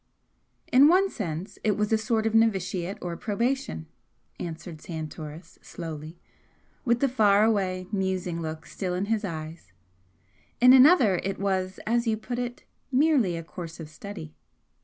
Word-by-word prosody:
"In 270 +3 +7
one 380 +4 +4
sense 175 -2 -5
it 210 -2 +1
was 210 +1 0
a - - +5
sort 220 0 0
of 225 - 0
novitiate 195 -4 +1
or 175 -1 -3
probation," 230 - -2 0.5
answered 165 -1 -7
Santoris, 160 0 -8
slowly, 160 -1 -8 0.7
with 240 -2 +1
the 275 - +4
far 210 -5 +4
away, 190 -4 +1
musing 185 -4 -1
look 160 0 -5
still 180 -2 -4
in 185 +2 -1
his 220 0 0
eyes 155 - -7 0.9
"In 250 +1 +8
another 260 - +7
it 195 +2 -3
was, 190 -1 -1
as 235 +2 +1
you 220 -1 +1
put 240 +3 -5
it, 245 0 -5 0.3
'merely' 260 - +3
a 165 - -5
course 165 0 -8
of 155 -2 -8
study. 155 - -9
195 Hz, 150 wpm, -27 LUFS, 170-225 Hz, 0.9 s, In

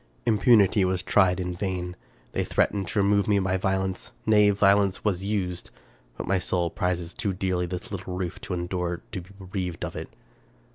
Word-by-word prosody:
Importunity 105 -3 +5
was 95 0 0
tried 95 -3 +3
in 90 -1 -2
vain. 90 -1 -3 0.4
They - - 0
threatened 100 -3 0
to 100 +3 +1
re - - +2
move 100 0 +3
me 105 -1 +3
by 95 -1 +1
violence, 95 0 -1
— - - -35
nay, 105 -1 +5
violence 100 -1 +3
was 95 -3 0
used; 95 -4 -2 0.5
but - - -4
my 95 0 +1
soul 90 -2 0
prizes 90 -1 -2
too 105 -6 -2
dearly 90 -1 -1
this 90 +2 -6
little 95 -2 -5
roof 90 -1 -4
to 90 - -4
endure 85 0 -3
to 95 -4 -4
be 90 - -16
bereaved 90 -3 -4
of - - -7
it. - - -6
95 Hz, 190 wpm, -26 LUFS, 90-100 Hz, 0.5 s, Importunity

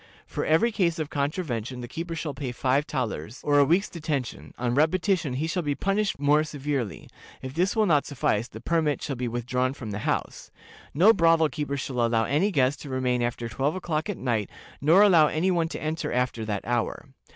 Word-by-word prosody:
For - - -4
every 165 +10 +3
case 180 -6 +1
of 155 -2 -4
contravention 135 - -2
the 120 - -6
keeper 165 +6 -5
shall 155 -2 -4
pay 135 -3 -4
five 135 +4 +1
thalers, 120 - -4
or 145 -1 +3
a - - +7
week's 175 +8 +2
detention; 150 -7 -4
on 120 -1 -1
repetition, 160 +1 +1
he 140 +5 -1
shall 170 +3 -1
be 145 -3 -1
punished 200 +4 0
more 145 +2 +3
severely; 140 -7 -4 0.4
if 130 0 -6
this 180 +7 +1
will 220 -1 +3
not 150 -7 +2
suffice, 120 -5 0
the 110 - -11
permit 155 0 +1
shall 140 - -3
be 125 0 -3
withdrawn 125 +2 -1
from 110 -6 -7
the 105 - -4
house. - - -3 0.5
No 195 +9 +7
brothel 165 -4 +4
keeper 145 -2 -3
shall 125 -2 -2
allow 115 -1 +2
any 150 - +1
guest 140 -6 +1
to 145 - -8
remain 130 -1 0
after 120 0 -2
twelve 135 +7 -1
o'clock 170 -1 -2
at 205 - -3
night, 115 -6 -1 0.3
nor 165 +8 +6
allow 170 -7 +6
any 170 +5 +1
one 170 -2 +1
to - - -6
enter 155 +1 -2
after 125 -2 -1
that 105 -2 -3
hour. 120 0 -1
145 Hz, 205 wpm, -26 LUFS, 125-165 Hz, 0.5 s, a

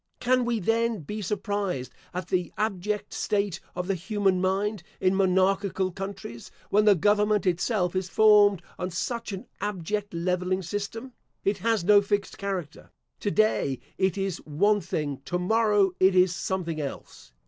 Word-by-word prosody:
Can 255 0 +2
we 235 -2 0
then 225 +1 0
be 210 +9 -5
surprised 200 - -2 0.2
at 180 -1 -5
the 180 -2 0
abject 210 -1 -2
state 200 -3 -1 0.2
of 180 0 -2
the 195 - 0
human 195 0 0
mind 195 +2 0 0.2
in 185 0 +2
monarchical 190 0 +2
countries, 195 -11 -7 0.2
when 210 +1 +4
the 205 -2 +7
government 210 +3 +2
itself 180 +1 0
is 185 -1 -1
formed 205 -3 +5 0.2
on 180 0 -2
such 230 +6 -3
an 190 -1 -6
abject 205 +1 -3
levelling 180 +2 -1
system? 205 +8 -5 0.3
It 200 0 0
has 225 -1 +1
no 205 +2 +6
fixed 200 0 -2
character. 190 -6 -5 0.3
To 205 - -1
day 205 - +1 0.2
it 190 -1 +1
is 195 -3 -1
one 205 +8 +1
thing; 145 -6 -3
to 180 - -1
morrow 205 +1 +3
it 190 0 +5
is 180 -1 +5
something 170 -6 -2
else. 140 - -8
195 Hz, 155 wpm, -26 LUFS, 180-210 Hz, 0.3 s, the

